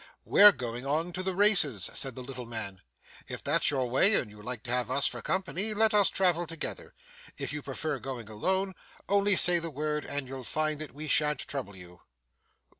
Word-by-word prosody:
'We're 205 0 +7
going 120 -3 -5
on 160 +5 -1
to 185 - -2
the 185 0 -2
races,' 175 - +3
said 135 -4 -1
the 130 - -7
little 125 -2 -8
man. 105 -5 -4 0.5
'If - - -7
that's - - +3
your 135 -3 0
way 160 - +5
and 110 - 0
you 105 0 -14
like 120 0 -6
to 120 - -4
have 125 -2 0
us 140 +2 +1
for - - -1
company, 190 +3 -2
let 220 +1 +3
us 205 -2 +4
travel 175 -3 +1
together. 165 - -6 0.4
If - - -4
you 150 - -4
prefer 140 +1 -4
going 125 -5 -7
alone, 190 - -1 0.3
only 200 0 +3
say 175 -1 +5
the 165 0 -4
word 150 +1 -3
and 140 -2 -4
you'll 130 0 -7
find 155 +3 -2
that 155 -3 -7
we 155 +1 -6
shan't 150 0 +2
trouble 125 -8 -6
you. 90 -1 -13
150 Hz, 200 wpm, -29 LUFS, 125-180 Hz, 0.5 s, We're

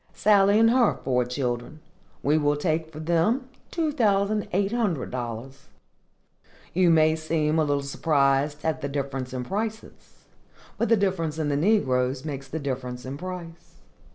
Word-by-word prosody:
Sally 205 0 +4
and 225 0 +5
her 245 -3 +3
four 125 -1 +1
children. 125 +2 -3 0.4
We 145 +2 +3
will 145 -1 +2
take 160 +1 -1
for 155 - -9
them 175 - +1 0.2
two 320 -3 -1
thousand 210 -5 +1
eight 195 +2 +1
hundred 210 - -1
dollars. 125 +2 -6 1.1
You 180 0 +4
may 155 -1 +4
seem 155 0 0
a - - +4
little 145 -1 0
surprised 140 +1 +1
at 160 -1 -1
the 140 - -3
difference 135 -2 -3
in 125 -1 -4
prices, 220 - -6 0.5
but 230 - +1
the 230 - +5
difference 175 -6 -1
in 155 -2 -1
the 145 - +1
negroes 135 -7 +1
makes 135 -3 -5
the 150 - -5
difference 125 -3 -4
in 130 +1 -5
price. 175 0 -8
155 Hz, 155 wpm, -25 LUFS, 135-195 Hz, 1.1 s, and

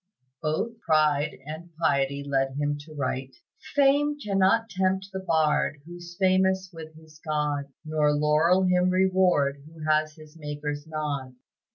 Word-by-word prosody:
Both 165 +9 -2
pride 155 -4 +2
and 160 +3 -8
piety 140 -3 +1
led 135 -1 0
him 145 0 0
to 155 -1 -13
write, 130 -1 -3 0.4
"Fame 290 +1 +3
cannot 205 -1 +2
tempt 190 -1 -1
the 190 - -3
bard 160 -4 +1
Who's 175 0 -11
famous 190 0 +2
with 160 -1 -10
his 155 -1 -18
God, 150 -2 -2
Nor 155 -1 +2
laurel 155 +5 +3
him 180 0 +3
reward 185 -7 +2
Who 160 0 -12
has 155 0 +2
his 155 0 -15
Maker's 145 -1 -5
nod." 145 -5 -4
155 Hz, 140 wpm, -26 LUFS, 145-185 Hz, 0.4 s, Fame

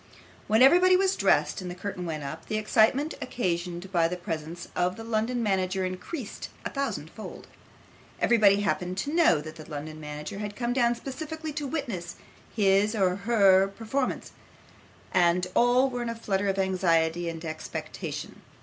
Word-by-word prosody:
When 220 +4 +5
everybody 360 +7 +7
was 385 +1 +2
dressed - - +2
and 180 - -5
the 175 - -6
curtain 180 -1 -5
went 155 -3 -4
up, 155 +4 -7
the 215 - -1
excitement 225 +8 +2
occasioned 180 -5 -3
by 170 -3 +3
the 180 +2 -4
presence 170 -1 -5
of 180 +1 +1
the 225 - -8
London 230 +2 -1
manager 190 -2 0
increased 200 - -6 0.2
a - - -3
thousand 225 - -3
fold. 220 - -9 0.7
Everybody 205 -4 +5
happened 185 -2 -1
to 285 +9 -2
know 320 - +4
that 155 +1 -9
the 155 - -11
London 155 +1 -6
manager 150 +4 -6
had 205 -1 -5
come 240 -1 -1
down 240 -2 +2
specially 315 +5 -6
to 295 -1 -3
witness 240 - -4 0.4
his 205 +1 +3
or 185 -3 +2
her 200 -2 +5
own 195 - -7
performance, 250 +5 -2 0.8
and 180 0 +3
all 245 +2 +4
were 245 -2 -4
in 240 - -2
a 230 - -3
flutter 200 -3 -1
of 195 0 0
anxiety 175 -3 +1
and 165 0 -7
expectation. 160 0 -6
195 Hz, 170 wpm, -27 LUFS, 175-240 Hz, 0.8 s, everybody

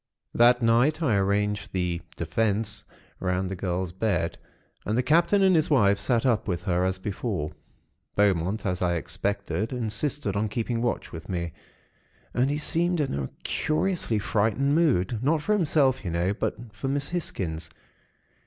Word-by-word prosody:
"That 120 +1 +5
night, 125 +8 +3
I 130 -8 +2
arranged 105 +1 0
the 90 -2 -1
'Defense' 105 +4 -1 0.3
round 90 0 -1
the - - -2
girl's 90 -1 -2
bed, 90 -4 -1 0.5
and 110 +3 -1
the 125 - +2
Captain 170 +8 +4
and 190 -2 +5
his 155 -2 +2
wife 100 -9 +4
sat 120 -2 +1
up 115 -5 +2
with 90 -3 -2
her, 90 0 +1
as 95 0 0
before. 95 -5 -3 0.6
Beaumont, 100 0 +1
as 90 -2 -1
I 90 -1 +2
expected, 100 - -2
insisted 120 -1 -1
on 105 +1 0
keeping 115 +2 -2
watch 120 -1 -2
with 80 0 -9
me, 85 -3 -3 0.8
and 125 +2 +2
he 145 - 0
seemed 170 +3 +1
in 145 - 0
a 70 -1 -2
curiously 155 - 0
frightened 110 +7 +1
mood; 125 - +2
not 150 +3 +1
for 210 - +2
himself, 150 - +2
you 90 - -3
know; 85 +3 0
but - - -2 0.2
for 110 +5 -5
Miss 140 +1 -1
Hisgins. 85 - -3
105 Hz, 160 wpm, -26 LUFS, 95-135 Hz, 0.8 s, That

